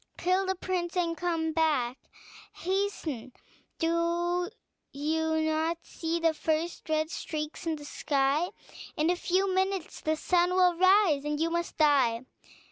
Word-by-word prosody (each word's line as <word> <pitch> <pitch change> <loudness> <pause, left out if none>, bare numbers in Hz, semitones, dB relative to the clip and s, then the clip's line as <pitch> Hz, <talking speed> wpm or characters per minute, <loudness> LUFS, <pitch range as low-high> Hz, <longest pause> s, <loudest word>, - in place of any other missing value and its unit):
Kill 370 +2 +1
the 380 - 0
prince 360 -1 -3
and 335 -2 +1
come 330 -2 -1
back; 295 -7 +1 0.6
hasten: 345 - -2 0.4
do 345 +2 0 0.4
you 315 +2 0
not 315 +2 0
see 330 +1 -3
the 330 -1 +3
first 320 +2 -2
red 310 +1 0
streaks 305 0 -5
in 325 - +1
the 295 -1 -10
sky? 285 +3 +1 0.5
In 310 +3 +3
a - - +1
few 370 +2 +1
minutes 380 -2 -1
the 315 0 +1
sun 355 +2 +2
will 365 -1 +5
rise, 370 -5 +4
and 295 0 -2
you 330 +1 +1
must 340 0 -2
die." 270 -7 +3
330 Hz, 140 wpm, -29 LUFS, 310-355 Hz, 0.6 s, will